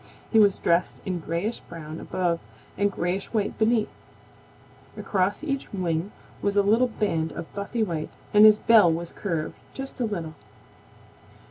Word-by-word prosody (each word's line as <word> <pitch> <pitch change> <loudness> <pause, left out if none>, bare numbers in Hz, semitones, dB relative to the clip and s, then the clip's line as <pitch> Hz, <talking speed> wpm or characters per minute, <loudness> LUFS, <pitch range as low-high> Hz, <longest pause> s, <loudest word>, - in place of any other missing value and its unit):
He 225 - +5
was 205 -2 +5
dressed 170 +1 +1
in 185 -2 -2
grayish 170 +8 -2
brown 160 -2 -9
above 175 -2 -1 0.4
and 205 0 +1
grayish 185 +2 -2
white 210 -3 0
beneath. 220 -1 +3 1.1
Across 195 +5 0
each 275 -3 -3
wing 180 -1 -2 0.3
was 200 0 0
a 200 - +5
little 225 +5 +4
band 165 -9 -1
of 165 - -8
buffy 205 +3 -2
white, 165 -6 -3 0.2
and 210 0 +7
his 215 -1 +9
bill 215 -6 +6
was 170 +1 -3
curved 165 -6 -3 0.2
just 270 0 -7
a 245 - +1
little. 170 -7 -4
200 Hz, 150 wpm, -25 LUFS, 170-215 Hz, 1.1 s, his